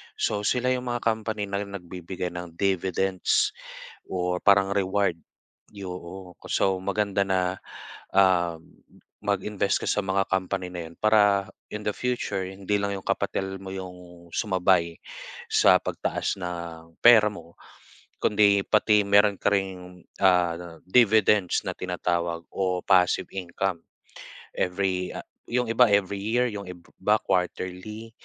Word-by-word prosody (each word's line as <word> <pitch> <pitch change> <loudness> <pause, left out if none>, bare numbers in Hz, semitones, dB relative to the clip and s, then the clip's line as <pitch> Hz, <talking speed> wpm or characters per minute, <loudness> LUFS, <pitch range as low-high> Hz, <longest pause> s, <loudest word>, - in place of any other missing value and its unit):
So 105 0 -1
sila 125 +4 +1
'yong 125 0 -1
mga 120 -1 -2
company 110 -2 -1
na 100 +1 -2
nagbibigay 90 -2 -6
ng 90 -1 -7
dividends 95 0 +1 0.6
or 90 -1 -1
parang 100 -1 +5
reward. 100 -2 +1 0.6
Yung 90 -2 -8
ko - - -17
so 95 -1 +2
maganda 100 +1 0
na, 95 -1 0 0.6
ah, 90 -3 +4 0.7
mag-invest 100 0 0
ka - - -3
sa 105 - +1
mga 95 0 0
company 95 -1 -1
na 85 -2 -6
'yon 85 - -17
para 105 -2 +4 0.2
in 105 - -4
the 105 - +1
future, 120 -6 -2
hindi 95 +2 -2
lang 100 0 -1
'yong 95 - -7
kapital 95 0 -1
mo 95 0 -8
'yong 90 -2 -10
sumabay 95 -5 +2 0.6
sa - - +6
pagtaas - - -2
ng 85 -2 -7
pera 110 -3 +7
mo 85 -4 -13 0.6
kundi 100 -1 +4
pati 105 -1 +4
meron 100 0 +4
ka - - -1
ring, 90 -2 -4 0.2
ah, 90 -2 +2
dividends 105 -3 +4
na - - 0
tinatawag 85 -2 -2
o 90 -2 -1
passive 90 -2 +3
income. 95 -1 -3 0.8
Every, 90 0 -1
ah, - - -6 0.2
yung 125 0 -1
iba 120 +2 +5
every 100 -1 +1
year, 120 +4 +1
yung 100 -2 -7
iba 90 +3 -2
quarterly. 95 +4 -3
95 Hz, 130 wpm, -26 LUFS, 90-105 Hz, 0.8 s, pera